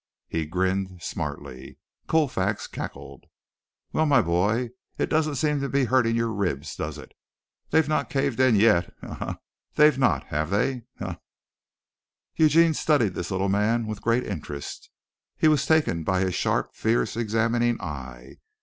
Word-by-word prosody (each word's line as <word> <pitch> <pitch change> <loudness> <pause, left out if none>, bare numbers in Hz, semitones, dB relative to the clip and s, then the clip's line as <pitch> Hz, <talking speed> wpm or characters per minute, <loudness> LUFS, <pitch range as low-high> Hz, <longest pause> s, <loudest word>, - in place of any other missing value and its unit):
He 80 -1 -2
grinned 95 +2 -1
smartly. 70 -4 -6 0.3
Colfax 115 -11 +1
cackled. - - -8 0.7
"Well, 155 - +2
my 140 -4 +5
boy, 105 +8 +1 0.3
it - - -1
doesn't 155 -1 +1
seem 150 +1 0
to 140 - -2
be 140 -1 +2
hurting 120 -2 +2
your 115 -1 0
ribs, 90 -9 -2
does - - -4
it? - - -12 0.6
They've 160 -2 +3
not 155 - 0
caved 135 -3 -1
in 130 -3 +5
yet. 100 -4 +4
Ha! - - -8
Ha! - - -6
Ha! - - -5
Ha! - - -15 0.4
They've 150 -3 +5
not, 130 - +2
have 75 +2 -1
they? 120 +5 0
Ha! - - -5
Ha!" - - -6 1.2
Eugene 160 +1 +5
studied 140 - +2
this 90 - -4
little 95 +1 0
man 105 +4 +1
with 110 -1 -5
great 115 +2 +1
interest. 75 -6 -6 0.5
He - - +3
was 150 -2 +3
taken 150 - +2
by 95 +3 +1
his 95 -1 0
sharp, 90 - 0
fierce, 110 -1 0
examining 115 +1 +1
eye. 65 -4 -8
115 Hz, 160 wpm, -25 LUFS, 90-135 Hz, 1.2 s, my